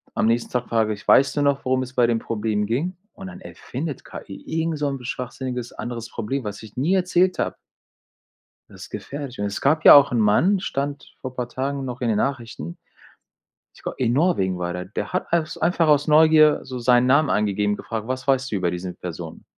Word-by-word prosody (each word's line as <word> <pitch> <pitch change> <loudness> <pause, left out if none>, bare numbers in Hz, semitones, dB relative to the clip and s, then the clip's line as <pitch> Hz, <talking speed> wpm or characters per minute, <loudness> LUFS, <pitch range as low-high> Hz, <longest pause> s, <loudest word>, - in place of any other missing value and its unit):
am - - +1
nächsten 115 +1 +1
Tag 125 -1 -1
frage 110 -2 +1
ich: 100 - -12
„Weißt 140 - +5
du - - +2
noch, 140 -1 +1
worum 130 0 +1
es 130 0 -9
bei 125 -2 +3
dem 115 -1 +1
Problem 105 -2 -2
ging?“ 150 - -2 0.2
Und, 195 - -9
dann 190 0 -10
erfindet 145 -3 -6
KI 95 - -10
irgend 160 -1 -2
so 145 -1 0
‘n 135 -2 -5
schwachsinniges 125 -1 -5
anderes 115 -1 -6
Problem, 130 +5 -3
was 105 0 -6
ich 110 -1 -13
nie 150 +9 +1
erzählt 185 0 +2
habe. - - -1 1.1
Das - - -12
ist - - -11
gefährlich 140 -4 -7
und 105 - -1
es 100 0 -4
gab 155 +3 +2
ja - - +12
auch 140 -1 +7
'n 120 - +1
Mann, 155 - +3
stand 140 -5 -4
vor 130 -1 -6
paar 125 -1 -3
Tagen 135 +2 -3
noch 125 -1 -6
in 120 - 0
den 110 - +1
Nachrichten, 115 - -3 1.0
ich - - -19
g - - -2
in 120 -2 +1
Norwegen 125 - +1
war 90 0 -2
der, 90 0 -5
der 100 - -5
hat 185 - -3
als 165 -2 0
einfach 170 -1 +1
aus 150 0 +3
Neugier 155 0 +6
so 130 -1 -6
seinen 125 +1 +4
Namen 140 +3 +4
angegeben 105 0 +1
und - - -1
gefragt: 110 -1 -5
„Was 130 0 -3
weißt 135 -1 +1
du 105 - -1
über 90 -2 0
diese 90 +1 -5
Person?“ 85 -2 -8
130 Hz, 220 wpm, -23 LUFS, 110-145 Hz, 1.1 s, ja